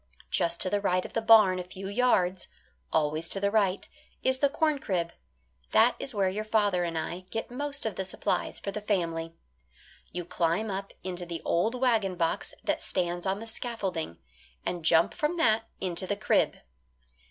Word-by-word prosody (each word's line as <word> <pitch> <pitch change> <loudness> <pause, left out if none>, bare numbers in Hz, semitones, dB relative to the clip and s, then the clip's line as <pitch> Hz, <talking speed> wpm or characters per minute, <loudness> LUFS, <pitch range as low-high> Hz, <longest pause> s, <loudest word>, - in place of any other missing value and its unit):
Just 170 0 +1
to 185 - +4
the 205 0 +1
right 185 -2 +1
of - - -9
the 225 - 0
barn 215 -5 +7
a - - -3
few 190 +2 -8
yards 195 -5 +2 0.4
always 155 +1 +1
to 195 - -1
the 200 0 +1
right 200 -3 +1 0.4
is 260 0 +2
the 280 - +4
corn 305 0 +1
crib. 175 -8 -1 0.6
That 235 +3 +6
is 275 - -2
where 200 -5 +1
your 200 +3 -2
father 205 -4 +2
and 165 -1 -2
I 175 +3 -4
get 225 +3 -4
most 285 +1 -2
of 215 -5 -2
the 190 - -1
supplies 190 - -2
for 200 - -4
the 210 - -5
family. 165 -5 -1 0.8
You 175 -1 -4
climb 175 +4 0
up 195 +1 -4
into 180 -1 -5
the 170 -1 -5
old 215 +8 +1
wagon 225 -7 +2
box 165 -2 -1
that - - 0
stands 175 0 -1
on 195 +1 0
the 225 - -7
scaffolding, 195 - -4 0.5
and 175 -2 -3
jump 165 +1 +4
from 310 +3 -1
that 225 -7 +2
into 185 0 -2
the 205 - 0
crib. 215 - +2
195 Hz, 185 wpm, -29 LUFS, 175-220 Hz, 0.8 s, barn